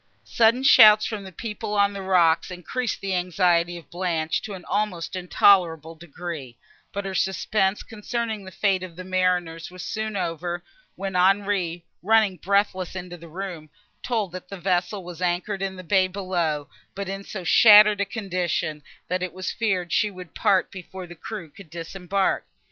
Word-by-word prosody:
Sudden 230 +3 +3
shouts 215 -6 +8
from 215 -3 -4
the 190 - -9
people 210 +2 -5
on 200 0 +3
the 200 - -6
rocks 175 -4 +3
increased 190 +7 -4
the 195 -1 -2
anxiety 175 -1 +1
of 170 - -14
Blanche 170 -3 -1
to 205 - -6
an 180 - -11
almost 195 -4 -2
intolerable 175 -3 +3
degree: 160 -5 -8 0.3
but 200 0 -4
her 195 - -4
suspense, 190 +1 0
concerning 225 -1 -4
the 190 - -9
fate 190 0 0
of 185 -3 -8
the 185 - -8
mariners, 180 -3 0
was 180 0 -9
soon 215 -1 -3
over, 175 0 -3 0.3
when 195 -1 -5
Henri, 185 -2 +1 0.2
running 215 -1 +3
breathless 190 -1 0
into 180 -1 -6
the 170 -1 -12
room, 170 -2 -7 0.3
told 220 -7 -1
that 180 0 -9
the 195 - -7
vessel 185 +2 -1
was 175 0 -9
anchored 180 +3 -1
in 195 -1 -2
the 185 - -9
bay 190 +1 +3
below, 175 -6 -2 0.3
but 200 0 -4
in 195 +1 -5
so 190 -2 -7
shattered 210 +2 +7
a - - +2
condition, 180 -7 -2 0.3
that 180 +1 -1
it 185 -2 -3
was 185 +1 -4
feared 190 -6 -1
she 210 - +2
would 180 -3 -11
part 190 -2 +2
before 185 0 -9
the 175 - -11
crew 190 +1 -7
could 160 +3 -15
disembark. 180 +4 -2
185 Hz, 170 wpm, -24 LUFS, 175-200 Hz, 0.3 s, shouts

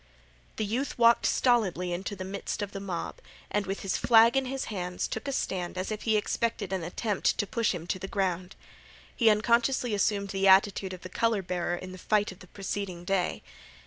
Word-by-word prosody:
The 215 - -1
youth 245 +7 -2
walked 235 0 +5
stolidly 190 -8 +2
into 190 +4 -4
the 185 - -6
midst 200 +2 -4
of 200 - -5
the 195 - -5
mob, 190 -4 -5 0.3
and 205 -2 0
with 195 +1 -3
his 195 - -1
flag 230 +1 +6
in 270 0 +2
his 265 +1 -3
hands 180 -2 -3
took 220 - -5
a - - 0
stand 185 -8 -2
as 185 +3 -3
if 215 - -4
he 220 -2 +2
expected 210 -2 -1
an 190 - -1
attempt 190 +4 -1
to - - +1
push 230 +2 0
him 170 -3 -5
to 185 - -2
the 190 - -5
ground. 185 -2 -2 0.6
He 230 -3 +5
unconsciously 235 +3 +2
assumed 200 0 +1
the 195 0 +1
attitude 190 0 +4
of 180 - -9
the 185 - -8
color 225 0 +1
bearer 175 -1 -1
in 185 +1 -8
the 185 - -9
fight 210 +1 +1
of 185 - -13
the 185 - -14
preceding 195 -2 -5
day. 190 -1 0
200 Hz, 210 wpm, -28 LUFS, 185-220 Hz, 0.6 s, flag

